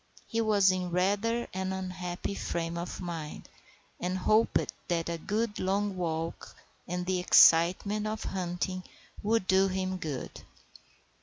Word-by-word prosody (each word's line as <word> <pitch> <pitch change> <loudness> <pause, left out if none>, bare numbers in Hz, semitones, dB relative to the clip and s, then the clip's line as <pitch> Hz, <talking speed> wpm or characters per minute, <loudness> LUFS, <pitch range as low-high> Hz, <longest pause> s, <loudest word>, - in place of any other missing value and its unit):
He 230 - -1
was 205 -4 +4
in 185 -1 -2
rather 205 +7 +1
an 190 0 -2
unhappy 185 0 -4
frame 170 -3 -3
of 170 +1 -5
mind, 165 -4 -6 0.5
and 180 +1 -1
hoped 215 +4 +2
that 170 -1 -1
a 170 -1 -3
good 215 +4 -2
long 195 +1 0
walk 165 -2 -3 0.3
and 180 0 -3
the 185 0 0
excitement 180 +5 +5
of 215 0 -3
hunting 185 0 -3 0.4
would 220 -1 +1
do 190 +1 +4
him 185 0 -2
good. 155 -7 -5
185 Hz, 135 wpm, -30 LUFS, 175-200 Hz, 0.5 s, excitement